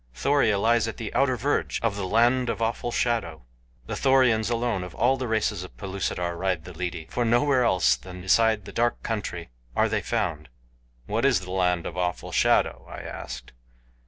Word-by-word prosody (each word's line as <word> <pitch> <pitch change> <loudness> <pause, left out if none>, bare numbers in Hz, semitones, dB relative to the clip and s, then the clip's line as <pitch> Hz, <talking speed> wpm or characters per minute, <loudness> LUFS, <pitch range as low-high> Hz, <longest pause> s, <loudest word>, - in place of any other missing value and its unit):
"Thoria 120 - +2
lies 115 +2 +2
at 115 - -5
the 110 -3 -5
outer 130 -2 +2
verge 140 +6 0
of 115 -3 +1
the 100 -2 -3
Land 120 +4 +3
of - - -2
Awful 115 +1 -1
Shadow. 95 - -1 0.4
The - - -4
Thorians 125 -5 +3
alone 115 -5 -1
of 90 - -9
all 130 +3 +3
the 130 -1 -4
races 110 -4 0
of 90 - -12
Pellucidar 95 -3 -3
ride 90 -2 -1
the 90 - -9
lidi, 85 -1 -4
for 120 - 0
nowhere 125 +3 +3
else 95 -6 +3
than 90 -1 -10
beside 110 +2 +2
the - - -8
dark 120 +1 0
country 95 - -4 0.3
are - - +3
they - - -1
found." - - -2 0.6
"What 110 - -1
is 135 -9 +3
the 90 -1 -8
Land 90 -2 +1
of 90 - -6
Awful 90 -1 -2
Shadow?" - - +2
I - - -7
asked. - - -8
110 Hz, 190 wpm, -26 LUFS, 90-120 Hz, 0.6 s, Land